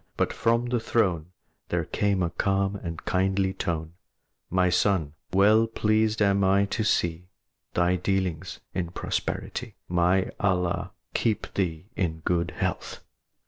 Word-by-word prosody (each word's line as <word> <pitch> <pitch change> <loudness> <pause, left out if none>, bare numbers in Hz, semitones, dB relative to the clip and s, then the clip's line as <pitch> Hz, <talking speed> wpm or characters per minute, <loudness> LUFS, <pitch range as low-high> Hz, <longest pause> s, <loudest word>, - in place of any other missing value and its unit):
But - - +1
from 115 +1 +2
the 120 0 0
throne 90 -8 +1 0.4
There - - 0
came 100 -2 +1
a 85 - -1
calm 100 +2 0
and 85 -4 -6
kindly 95 +1 +1
tone: 80 -3 -3 0.6
"My 90 0 +2
son, 90 -5 +2 0.2
well 105 +4 +5
pleased 110 -1 +2
am 100 0 +3
I 100 +1 +4
to 110 - 0
see 85 -4 0 0.5
Thy 90 +1 +3
dealings 95 -2 -2
in 85 -2 -2
prosperity; - - -3
May 90 +2 +2
Allah 90 -3 0 0.2
keep 110 -2 0
thee 85 -4 -1
in 80 -5 -1
good 85 0 0
health! - - -3
95 Hz, 135 wpm, -26 LUFS, 85-100 Hz, 0.6 s, well